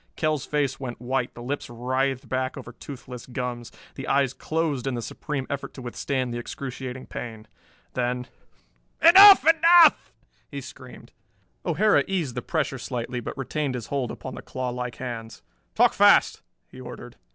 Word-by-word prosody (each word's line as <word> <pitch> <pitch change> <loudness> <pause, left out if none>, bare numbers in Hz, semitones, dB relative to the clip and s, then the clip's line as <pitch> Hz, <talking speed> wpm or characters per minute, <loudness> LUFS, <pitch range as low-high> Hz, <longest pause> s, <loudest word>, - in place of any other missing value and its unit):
Kell's 155 -3 -1
face 140 -3 -1
went 125 -3 -6
white, 125 +1 -2
the 120 - -9
lips 140 +4 -4
writhed 130 +2 -2
back 130 +3 -2
over 125 -2 -8
toothless 125 -1 -10
gums, 125 -2 -5 0.2
the 135 - -7
eyes 135 -2 +2
closed 150 -2 -2
in 135 - -1
the 120 - -3
supreme 140 +1 -4
effort 140 -1 -5
to 130 - -8
withstand 125 0 -3
the 120 - -3
excruciating 130 0 -6
pain. 110 -2 -8 0.5
Then 125 0 -1 0.7
"Enough, 385 +3 +9
enough!" 330 +1 +6 0.4
he - - -6
screamed. - - -12 0.5
O'Hara 215 -1 +3
eased 175 -10 -2
the 125 - -4
pressure 150 -4 -2
slightly 125 0 -4
but 120 - -7
retained 135 0 -2
his 120 - -5
hold 135 -4 -1
upon - - -7
the - - -8
clawlike 125 -1 -4
hands. 115 -4 -7 0.3
"Talk - - +4
fast," - - +5 0.3
he - - -12
ordered. - - -10
130 Hz, 155 wpm, -25 LUFS, 125-140 Hz, 0.7 s, Enough